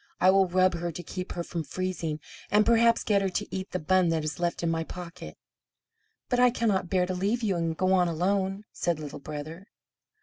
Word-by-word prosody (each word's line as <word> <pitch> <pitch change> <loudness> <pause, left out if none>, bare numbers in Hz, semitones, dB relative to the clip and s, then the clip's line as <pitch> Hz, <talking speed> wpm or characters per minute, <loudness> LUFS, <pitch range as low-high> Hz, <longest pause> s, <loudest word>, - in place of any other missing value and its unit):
I 185 - +6
will 195 0 +4
rub 185 +1 +3
her 170 0 -3
to 175 +2 -7
keep 180 0 -6
her 175 - -3
from 170 -1 -4
freezing, 170 -3 -3 0.3
and 210 +1 +4
perhaps 230 0 +4
get 200 -2 +2
her 195 - 0
to 205 +2 -3
eat 190 0 -4
the - - -2
bun 185 +1 +2
that 160 -1 0
is 155 0 -4
left 175 0 -1
in 165 - +1
my 165 0 -1
pocket." 175 +1 -9 0.9
"But 245 - +1
I 250 0 +7
cannot 210 -7 0
bear 185 -2 +2
to 185 - -3
leave 205 +6 0
you, 200 -4 +1
and 165 -1 -1
go 185 0 +2
on 180 -2 +4
alone," 190 +4 0
said 170 -2 -1
Little 150 -2 -7
Brother. 155 +6 -7
185 Hz, 215 wpm, -28 LUFS, 170-195 Hz, 0.9 s, I